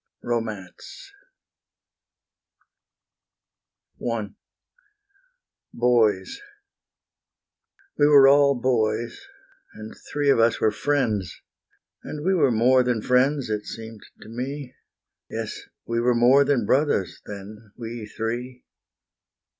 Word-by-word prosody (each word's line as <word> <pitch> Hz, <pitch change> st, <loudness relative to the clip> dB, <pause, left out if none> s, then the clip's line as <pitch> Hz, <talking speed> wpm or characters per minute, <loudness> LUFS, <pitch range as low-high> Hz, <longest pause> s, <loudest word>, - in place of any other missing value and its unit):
Romance 120 Hz, -, -5 dB, 2.9 s
I -, -, -3 dB, 1.4 s
Boys 115 Hz, -, +1 dB, 1.6 s
We 145 Hz, -, +5 dB
were 140 Hz, -2 st, +7 dB
all 140 Hz, -1 st, +4 dB
boys, 115 Hz, -2 st, -1 dB, 0.5 s
and 110 Hz, 0 st, -9 dB, 0.2 s
three 145 Hz, -1 st, +2 dB
of 115 Hz, -, +2 dB
us 115 Hz, 0 st, +3 dB
were 110 Hz, -, +2 dB
friends; 105 Hz, -6 st, -1 dB, 0.6 s
And 150 Hz, +1 st, -7 dB
we 190 Hz, -, +3 dB
were 150 Hz, -7 st, +3 dB
more 125 Hz, +3 st, +4 dB
than 125 Hz, -3 st, -1 dB
friends, 125 Hz, 0 st, +1 dB
it 105 Hz, -1 st, -3 dB
seemed 110 Hz, -1 st, -9 dB, 0.2 s
to -, -, -14 dB
me: 130 Hz, +3 st, -6 dB, 0.6 s
Yes, -, -, -5 dB, 0.2 s
we 115 Hz, 0 st, -1 dB
were 120 Hz, +1 st, +2 dB
more 125 Hz, +4 st, +5 dB
than 135 Hz, -6 st, +1 dB
brothers 130 Hz, -, 0 dB
then, 105 Hz, +1 st, -10 dB
we 115 Hz, -2 st, -7 dB
three. 120 Hz, +4 st, -5 dB
120 Hz, 100 wpm, -24 LUFS, 110-135 Hz, 2.9 s, were